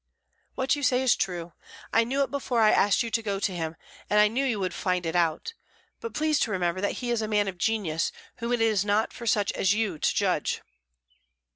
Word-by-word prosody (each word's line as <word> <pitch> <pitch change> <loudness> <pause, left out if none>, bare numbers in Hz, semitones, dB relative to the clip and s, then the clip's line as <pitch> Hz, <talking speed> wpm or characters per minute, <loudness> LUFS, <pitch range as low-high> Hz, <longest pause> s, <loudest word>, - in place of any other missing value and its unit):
"What 265 +2 +1
you 290 - -5
say 260 -2 +2
is 255 - +4
true; 175 -2 -3 0.4
I 230 0 +4
knew 270 +4 +1
it - - -5
before 270 -4 -1
I 215 -1 +6
asked 205 +3 +3
you 230 - -5
to 230 - +1
go 200 -3 -2
to 195 -2 -1
him, 160 -1 -3 0.3
and 210 - +4
I 210 0 +6
knew 250 +5 -1
you 240 -6 0
would 185 -2 -2
find 180 -2 -1
it 165 +1 -2
out; 170 - 0 0.5
but 460 - -7
please 310 -1 +1
to - - +1
remember 180 -1 -1
that 205 - 0
he 240 - -1
is 235 -2 0
a 215 - -2
man 210 -1 +1
of 185 -2 -5
genius, 185 -6 0 0.3
whom 235 0 -3
it 240 -2 +1
is 215 -4 +3
not 210 +2 +1
for 235 - -8
such 205 -2 +2
as 190 +2 +1
you 210 -8 -1
to - - +1
judge." - - 0
210 Hz, 235 wpm, -27 LUFS, 185-240 Hz, 0.5 s, I